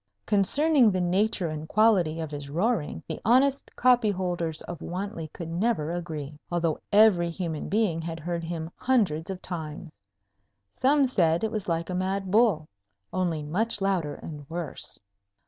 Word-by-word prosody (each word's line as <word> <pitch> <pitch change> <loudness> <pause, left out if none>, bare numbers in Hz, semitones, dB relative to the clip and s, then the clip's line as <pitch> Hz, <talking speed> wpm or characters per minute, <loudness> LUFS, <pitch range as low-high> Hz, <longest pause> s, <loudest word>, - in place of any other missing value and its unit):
Concerning 255 - +4
the 185 -2 0
nature 185 +1 +1
and 155 0 -5
quality 195 -7 +3
of 160 -2 -4
his 145 -1 -6
roaring, 175 +1 -1
the - - -5
honest 265 +4 +3
copyholders 185 -10 +1
of 175 - -7
Wantley 180 -2 -4
could 170 - -7
never 170 -3 0
agree, 155 -4 -5
although 165 -3 0
every 200 -5 +5
human 165 -3 -4
being 200 -6 +1
had 165 0 -5
heard 170 +1 -3
him 165 0 -4
hundreds 195 -11 +1
of 190 -1 -5
times. 160 -2 -6 0.8
Some 280 +2 +3
said 170 -8 +2
it 220 - 0
was 215 -4 -3
like 165 +2 -1
a - - -2
mad 190 +1 -1
bull, 205 -8 +3 0.5
only 170 -5 -1
much 210 +9 -1
louder 185 -7 0
and 145 -3 -9
worse. 170 -3 -5
175 Hz, 150 wpm, -27 LUFS, 160-210 Hz, 0.8 s, every